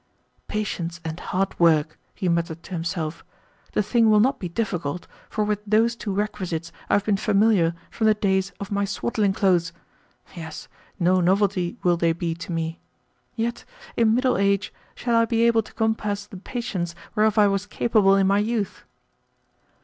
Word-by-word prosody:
"Patience 175 Hz, -5 st, -3 dB
and 160 Hz, +1 st, -4 dB
hard 190 Hz, +1 st, -2 dB
work!" 155 Hz, -2 st, +3 dB, 0.2 s
he 185 Hz, -, -2 dB
muttered 170 Hz, -1 st, -1 dB
to -, -, -14 dB
himself. 165 Hz, -2 st, -3 dB, 0.5 s
"The 210 Hz, -, +2 dB
thing 225 Hz, +2 st, +3 dB
will 215 Hz, -1 st, +6 dB
not 260 Hz, +5 st, +2 dB
be 180 Hz, -, -4 dB
difficult, 175 Hz, -5 st, -3 dB, 0.2 s
for 215 Hz, -, -1 dB
with 210 Hz, -1 st, 0 dB
those 220 Hz, +3 st, +2 dB
two 215 Hz, -3 st, -4 dB
requisites 185 Hz, -5 st, -3 dB, 0.2 s
I -, -, +1 dB
have 205 Hz, -, +1 dB
been 205 Hz, -2 st, +2 dB
familiar 200 Hz, -5 st, +3 dB, 0.2 s
from 220 Hz, -, 0 dB
the 215 Hz, -, +5 dB
days 190 Hz, -2 st, +1 dB
of 200 Hz, -, -6 dB
my 200 Hz, 0 st, +1 dB
swaddling 200 Hz, +1 st, 0 dB
clothes. 180 Hz, -3 st, +2 dB, 0.6 s
Yes, 160 Hz, -2 st, -8 dB, 0.3 s
no 180 Hz, +1 st, +3 dB
novelty 190 Hz, +2 st, +1 dB
will 175 Hz, -1 st, +3 dB
they 165 Hz, -1 st, +2 dB
be 170 Hz, 0 st, -2 dB
to 170 Hz, +1 st, -8 dB
me. 165 Hz, 0 st, -3 dB, 0.6 s
Yet, 235 Hz, +1 st, -2 dB, 0.3 s
in 225 Hz, -1 st, +3 dB
middle 255 Hz, -3 st, +2 dB
age, 200 Hz, 0 st, +1 dB, 0.2 s
shall 235 Hz, -1 st, 0 dB
I 230 Hz, 0 st, +5 dB
be 230 Hz, 0 st, +1 dB
able 230 Hz, -1 st, +4 dB
to 210 Hz, -, -15 dB
compass 210 Hz, -2 st, -1 dB
the 205 Hz, -2 st, -11 dB
patience 190 Hz, -5 st, -4 dB, 0.2 s
whereof 215 Hz, 0 st, +2 dB
I 210 Hz, -, +7 dB
was 195 Hz, 0 st, 0 dB
capable 210 Hz, -3 st, +3 dB
in 195 Hz, -1 st, +3 dB
my 200 Hz, +1 st, +3 dB
youth?" 215 Hz, -1 st, -2 dB
200 Hz, 170 wpm, -24 LUFS, 175-215 Hz, 0.6 s, I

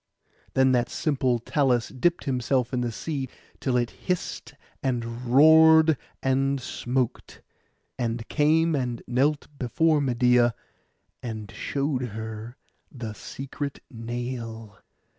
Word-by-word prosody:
Then 130 Hz, 0 st, +5 dB
that 125 Hz, -1 st, +2 dB
simple 130 Hz, -5 st, +1 dB
Talus 125 Hz, -1 st, +1 dB
dipped 170 Hz, +7 st, 0 dB
himself 130 Hz, -1 st, 0 dB
in 125 Hz, -, 0 dB
the 120 Hz, -1 st, -1 dB
sea, 135 Hz, +2 st, -4 dB, 0.3 s
till 130 Hz, -2 st, 0 dB
it 120 Hz, -1 st, 0 dB
hissed, 180 Hz, -2 st, -4 dB, 0.3 s
and 120 Hz, -1 st, -3 dB
roared, 160 Hz, +4 st, +7 dB, 0.3 s
and 135 Hz, +1 st, +1 dB
smoked; 125 Hz, 0 st, -3 dB, 0.6 s
and 115 Hz, -1 st, -2 dB
came 160 Hz, +2 st, +3 dB
and 125 Hz, -4 st, -2 dB
knelt 140 Hz, +5 st, +1 dB
before 155 Hz, +5 st, +2 dB
Medeia, 125 Hz, -2 st, +3 dB, 0.7 s
and 110 Hz, -4 st, -6 dB
showed 140 Hz, -2 st, -2 dB
her 110 Hz, 0 st, -6 dB, 0.3 s
the 115 Hz, -5 st, -6 dB
secret 140 Hz, +6 st, -6 dB
nail. 115 Hz, -3 st, -6 dB
125 Hz, 110 wpm, -26 LUFS, 120-140 Hz, 0.7 s, roared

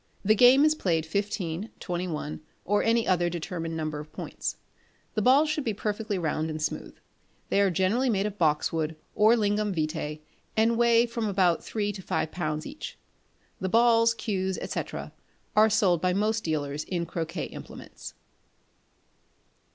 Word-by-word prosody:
The 215 Hz, -, +6 dB
game 250 Hz, +6 st, +7 dB
is 310 Hz, -, +5 dB
played 165 Hz, -, 0 dB
fifteen, 200 Hz, +1 st, -2 dB
twenty 180 Hz, 0 st, -3 dB
one, 155 Hz, -2 st, -4 dB, 0.2 s
or 205 Hz, +2 st, +2 dB
any 230 Hz, 0 st, +2 dB
other 175 Hz, -2 st, +2 dB
determined 165 Hz, -1 st, -4 dB
number 155 Hz, -1 st, -3 dB
of 150 Hz, +1 st, -10 dB
points. -, -, -5 dB, 0.6 s
The 215 Hz, -, 0 dB
balls 270 Hz, +7 st, +5 dB
should 305 Hz, -1 st, -1 dB
be 220 Hz, -4 st, -1 dB
perfectly 210 Hz, 0 st, -2 dB
round 160 Hz, -2 st, -1 dB
and 155 Hz, 0 st, -4 dB
smooth. 155 Hz, -, -4 dB, 0.5 s
They 200 Hz, -, +3 dB
are 200 Hz, -, +4 dB
generally 190 Hz, +9 st, +1 dB
made 200 Hz, -3 st, +1 dB
of 210 Hz, -1 st, -4 dB
boxwood 160 Hz, 0 st, +1 dB, 0.2 s
or 215 Hz, +3 st, +5 dB
lignum 205 Hz, -2 st, 0 dB
vitæ, 155 Hz, -1 st, -2 dB, 0.4 s
and 225 Hz, +1 st, +4 dB
weigh 235 Hz, 0 st, +5 dB
about 195 Hz, -6 st, +2 dB
three 205 Hz, -2 st, -2 dB
to 200 Hz, -2 st, -8 dB
five 160 Hz, -, -2 dB
lbs. 155 Hz, -3 st, -3 dB
each; 295 Hz, +2 st, -8 dB, 0.6 s
the 190 Hz, -, -2 dB
balls, 230 Hz, +1 st, +4 dB
cues, 190 Hz, -4 st, -2 dB
&c., -, -, -2 dB, 0.7 s
are 215 Hz, +1 st, +6 dB
sold 195 Hz, -6 st, +3 dB
by 185 Hz, 0 st, +2 dB
most 215 Hz, +3 st, 0 dB
dealers 150 Hz, -2 st, -2 dB
in 175 Hz, -2 st, -2 dB
croquet 165 Hz, -1 st, -4 dB
implements. -, -, -10 dB
190 Hz, 155 wpm, -27 LUFS, 165-220 Hz, 0.7 s, game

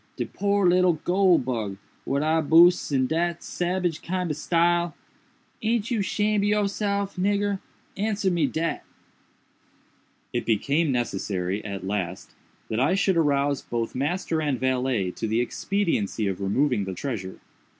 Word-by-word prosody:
de -, -, -2 dB
poor 200 Hz, -1 st, +1 dB
little 180 Hz, 0 st, +4 dB
goole 180 Hz, +3 st, +3 dB
bug, 115 Hz, -6 st, -3 dB, 0.3 s
what 140 Hz, +1 st, 0 dB
I 160 Hz, +1 st, +2 dB
boosed 170 Hz, +2 st, +5 dB
in 130 Hz, -2 st, +2 dB
dat 170 Hz, +4 st, -1 dB
sabage 175 Hz, -2 st, -1 dB
kind 180 Hz, -1 st, -2 dB
ob -, -, -2 dB
style! 170 Hz, +1 st, +1 dB, 0.7 s
Aint 230 Hz, 0 st, 0 dB
you 225 Hz, -4 st, +1 dB
shamed 210 Hz, +1 st, +1 dB
ob -, -, +2 dB
yourself, 200 Hz, -1 st, 0 dB
nigger?—answer 200 Hz, +1 st, -1 dB
me 170 Hz, -2 st, +2 dB
dat!" 165 Hz, +1 st, -2 dB, 1.5 s
It -, -, -2 dB
became 140 Hz, +8 st, +1 dB
necessary, 100 Hz, -5 st, -2 dB
at 100 Hz, -2 st, -5 dB
last, 95 Hz, -2 st, -4 dB, 0.3 s
that 110 Hz, -, -2 dB
I 145 Hz, +9 st, +3 dB
should 195 Hz, -1 st, +2 dB
arouse 145 Hz, -3 st, +2 dB
both 115 Hz, -1 st, -3 dB
master 160 Hz, +4 st, -1 dB
and 145 Hz, -5 st, -1 dB
valet 130 Hz, -7 st, 0 dB
to 110 Hz, -, -4 dB
the 110 Hz, +2 st, +1 dB
expediency 120 Hz, -, -1 dB
of 95 Hz, 0 st, -2 dB
removing 110 Hz, +2 st, +1 dB
the 95 Hz, -1 st, -5 dB
treasure. 100 Hz, -9 st, -5 dB
160 Hz, 140 wpm, -25 LUFS, 120-185 Hz, 1.5 s, boosed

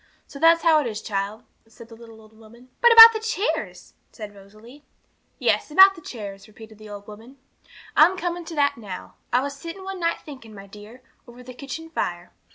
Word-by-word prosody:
So 280 Hz, -, -13 dB
that's 330 Hz, +1 st, +4 dB
how 320 Hz, -2 st, +4 dB
it 270 Hz, -, -4 dB
is, 215 Hz, -2 st, -6 dB
child,' 200 Hz, 0 st, -5 dB, 0.2 s
said 225 Hz, +1 st, -16 dB
the 230 Hz, -, -15 dB
little 225 Hz, -1 st, -16 dB
old 220 Hz, 0 st, -21 dB
woman. 230 Hz, +3 st, -19 dB
'But 475 Hz, -, +5 dB
about 455 Hz, 0 st, +10 dB
the 440 Hz, -, -4 dB
chairs?' 440 Hz, 0 st, -4 dB, 0.2 s
said 210 Hz, -3 st, -11 dB
Rosalie. 215 Hz, +8 st, -17 dB, 0.5 s
'Yes, -, -, -1 dB
about 385 Hz, +5 st, +6 dB
the 350 Hz, -, -15 dB
chairs,' 200 Hz, -7 st, -10 dB
repeated 220 Hz, 0 st, -16 dB
the 215 Hz, -1 st, -13 dB
old 205 Hz, -1 st, -10 dB
woman; 225 Hz, +6 st, -14 dB, 0.6 s
'I'm 345 Hz, +5 st, +4 dB
coming 350 Hz, 0 st, -4 dB
to 325 Hz, -, -9 dB
that 285 Hz, -3 st, 0 dB
now. 195 Hz, -5 st, -10 dB, 0.2 s
I 250 Hz, +1 st, +2 dB
was 280 Hz, +1 st, -6 dB
sitting 335 Hz, +6 st, -10 dB
one 385 Hz, -1 st, -7 dB
night 335 Hz, -1 st, -1 dB
thinking, 260 Hz, -7 st, -13 dB
my 195 Hz, 0 st, -12 dB
dear, 210 Hz, +5 st, -15 dB, 0.2 s
over 245 Hz, +1 st, -15 dB
the 255 Hz, 0 st, -12 dB
kitchen 310 Hz, +5 st, -9 dB
fire. 175 Hz, -, -5 dB
245 Hz, 200 wpm, -22 LUFS, 215-325 Hz, 0.6 s, about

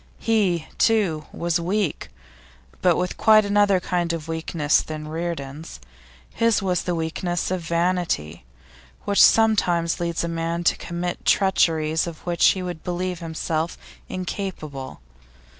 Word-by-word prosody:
He, 195 Hz, -8 st, +1 dB
too, 195 Hz, -9 st, +2 dB
was 170 Hz, 0 st, -1 dB
weak, 185 Hz, 0 st, -1 dB, 0.7 s
but 180 Hz, -2 st, +3 dB
with 180 Hz, 0 st, -2 dB
quite 215 Hz, -1 st, +5 dB
another 200 Hz, -1 st, +3 dB
kind 175 Hz, -1 st, -1 dB
of 165 Hz, -1 st, -5 dB
weakness 160 Hz, -2 st, +1 dB
than 155 Hz, -1 st, -7 dB
Reardon's. 160 Hz, -, -5 dB, 0.5 s
His 230 Hz, -1 st, +2 dB
was 185 Hz, -3 st, 0 dB
the 175 Hz, -, -2 dB
weakness 170 Hz, +2 st, -2 dB
of 185 Hz, -1 st, -1 dB
vanity, 170 Hz, -, -1 dB, 0.6 s
which 200 Hz, -, +3 dB
sometimes 180 Hz, -7 st, +4 dB
leads 170 Hz, -1 st, -1 dB
a -, -, -1 dB
man 165 Hz, +1 st, -2 dB
to -, -, +3 dB
commit 175 Hz, +1 st, -4 dB
treacheries 160 Hz, -4 st, +2 dB
of 165 Hz, -2 st, -9 dB
which 175 Hz, -1 st, -1 dB
he 185 Hz, -, +2 dB
would 175 Hz, -3 st, -6 dB
believe 180 Hz, 0 st, -3 dB
himself 160 Hz, 0 st, -3 dB, 0.3 s
incapable. 170 Hz, -, -5 dB
170 Hz, 130 wpm, -23 LUFS, 160-185 Hz, 0.7 s, quite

